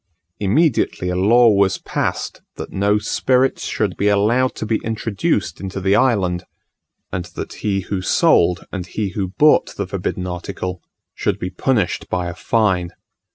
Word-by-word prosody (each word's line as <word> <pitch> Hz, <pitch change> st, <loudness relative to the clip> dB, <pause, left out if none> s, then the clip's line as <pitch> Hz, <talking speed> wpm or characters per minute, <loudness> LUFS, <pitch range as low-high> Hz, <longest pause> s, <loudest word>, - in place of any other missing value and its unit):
Immediately 110 Hz, -, +1 dB
a 90 Hz, -, -1 dB
law 115 Hz, +6 st, +5 dB
was 100 Hz, -3 st, +3 dB
passed, -, -, -3 dB
that -, -, -7 dB
no 100 Hz, +2 st, +2 dB
spirits 130 Hz, +4 st, +1 dB
should 100 Hz, -4 st, -1 dB
be 100 Hz, -, +1 dB
allowed 110 Hz, +6 st, +2 dB
to -, -, -4 dB
be 110 Hz, 0 st, 0 dB
introduced 110 Hz, -, -1 dB
into 95 Hz, 0 st, -4 dB
the 95 Hz, +1 st, +2 dB
island, 95 Hz, -7 st, +2 dB, 0.7 s
and 90 Hz, -2 st, -2 dB
that -, -, -5 dB
he 100 Hz, -2 st, 0 dB
who 95 Hz, 0 st, -3 dB
sold 90 Hz, -1 st, +3 dB
and 90 Hz, -3 st, -5 dB
he 105 Hz, +2 st, -2 dB
who 95 Hz, +1 st, -3 dB
bought 150 Hz, 0 st, +4 dB
the 100 Hz, -, -2 dB
forbidden 90 Hz, -1 st, -3 dB
article 90 Hz, 0 st, -5 dB, 0.3 s
should -, -, -1 dB
be 90 Hz, -, -4 dB
punished 110 Hz, -9 st, 0 dB
by 90 Hz, -1 st, -1 dB
a 85 Hz, -, -4 dB
fine. 90 Hz, -5 st, 0 dB
100 Hz, 155 wpm, -20 LUFS, 90-110 Hz, 0.7 s, law